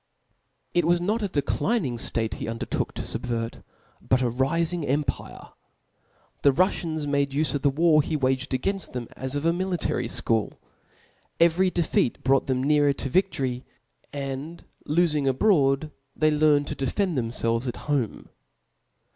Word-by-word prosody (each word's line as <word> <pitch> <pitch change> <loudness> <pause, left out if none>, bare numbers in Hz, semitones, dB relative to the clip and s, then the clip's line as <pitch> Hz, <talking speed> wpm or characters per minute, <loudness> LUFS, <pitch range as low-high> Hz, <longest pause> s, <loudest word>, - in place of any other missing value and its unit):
It 175 - +3
was 175 +1 +3
not 210 +6 0
a 205 - 0
declining 145 - -1
ftate 115 -1 -1
he - - -5
undertook 115 0 -3
tofub 115 - -4
vert, 115 -2 -3 0.4
but 130 0 +1
a 120 - +1
rifing 165 +7 0
empire. 140 -1 -2 0.9
The 140 - +5
Ruffians 160 -1 0
made 140 -1 +1
ufe 145 -1 0
of 145 - -1
the 140 - +3
war 155 +2 +4
he 155 - -3
waged 130 -1 0
againft 190 +10 -2
them, 125 -2 -4
as 130 +1 -4
of 145 +2 -2
a 165 - +3
mi 180 +2 -1
litary 175 -9 -1
fchool. 115 -2 0 0.9
Every 170 +3 +4
defeat 170 -8 0
brought 135 0 +2
them 130 -1 0
nearer 145 0 +3
to 135 - -4
viftory; 135 -9 0 0.5
and 140 +4 -6 0.2
lofing 150 -3 +2
abroad, 140 -1 +2 0.3
tbcy 155 -1 +3
learnt 145 -2 +4
to - - -2
de* 135 - -2
fend 195 -5 0
themfelves^ 115 0 -1
at 120 - -3
home. 140 -7 -2
145 Hz, 155 wpm, -25 LUFS, 130-165 Hz, 0.9 s, The